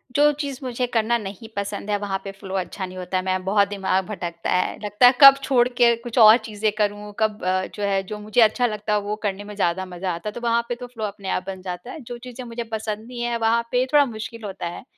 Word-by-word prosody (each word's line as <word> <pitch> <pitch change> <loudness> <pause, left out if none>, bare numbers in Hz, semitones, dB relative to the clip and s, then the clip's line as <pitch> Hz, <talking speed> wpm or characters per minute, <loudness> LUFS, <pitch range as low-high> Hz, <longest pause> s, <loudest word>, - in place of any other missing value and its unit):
जो 295 +1 +5
चीज़ 280 -3 -4
मुझे 250 -1 -1
करना 235 0 +1
नहीं 210 +1 -8
पसंद 200 +1 -4
है 205 - +2
वहाँ 200 -1 -2
पे 195 - -6
फ्लो 195 0 -8
अच्छा 190 +1 -3
नहीं 185 0 -10
होता 185 +1 -2
है, 185 - -1
मैं 185 0 -1
बहुत 200 0 +3
दिमाग 190 -2 0
भटकता 175 -5 -4
है। 180 - +1
लगता 210 +4 +5
है 250 - +6
कब 275 -1 +11
छोड़ 250 -2 +3
के 240 -1 +4
कुछ 235 +1 -8
और 220 0 +9
चीज़ें 215 0 -1
करूँ, 205 0 -1
कब 215 -2 0
अ, 185 0 +1
जो 205 - -5
है 195 -1 +1
जो 210 - -6
मुझे 215 +3 +1
अच्छा 225 +3 +4
लगता 210 -1 -3
है 210 - +3
वो 210 - 0
करने 205 -1 -2
में 205 0 -9
ज़्यादा 190 -1 0
मज़ा 180 0 -4
आता 170 +5 -5
है। - - -9
तो 240 - -7
वहाँ 235 0 +2
पे 240 - -1
तो 245 +1 -8
फ्लो 235 -3 -8
अपने 200 -1 -6
आप 185 - -1
बन 190 -1 -6
जाता 180 +5 -6
है - - -8
जो 240 - -4
चीज़ें 250 +1 -9
मुझे 235 0 -5
पसंद 220 0 -4
नहीं 245 -1 -7
है 240 0 -1
वहाँ 230 +1 +2
पे 250 0 +2
थोड़ा 290 -1 +6
मुश्किल 220 -1 -7
होता 190 -3 -5
है। 170 - -7
210 Hz, 265 wpm, -23 LUFS, 195-235 Hz, -, कब